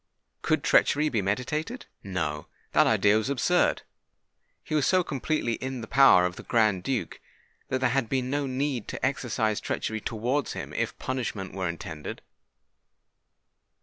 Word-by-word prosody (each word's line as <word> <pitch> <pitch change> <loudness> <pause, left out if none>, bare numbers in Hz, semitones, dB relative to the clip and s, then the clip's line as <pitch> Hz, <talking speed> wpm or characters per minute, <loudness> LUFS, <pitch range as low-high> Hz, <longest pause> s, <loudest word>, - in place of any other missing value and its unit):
Could - - +1
treachery 150 +1 +3
be 110 -7 0
meditated? 150 - -2 0.2
No—that 80 -6 -1
idea 105 +1 +4
was 110 - -3
absurd. 140 -4 +2 0.8
He - - -6
was 150 -3 +2
so 185 -1 +4
completely 140 -4 -1
in 130 +1 -4
the 115 - -7
power 135 -10 +6
of 90 0 -3
the - - -7
Grand 110 -5 +2
Duke, 125 +5 -3 0.5
that 130 0 -1
there 130 -2 +2
had 130 -4 0
been 130 -2 0
no 140 +1 -1
need 130 -3 -2
to - - -3
exercise 120 -5 0
treachery 110 -1 -3
towards 120 +7 -1
him, - - -6
if - - -2
punishment 115 -7 -4
were 95 -2 -2
intended. 80 -2 -7
125 Hz, 150 wpm, -27 LUFS, 105-135 Hz, 0.8 s, power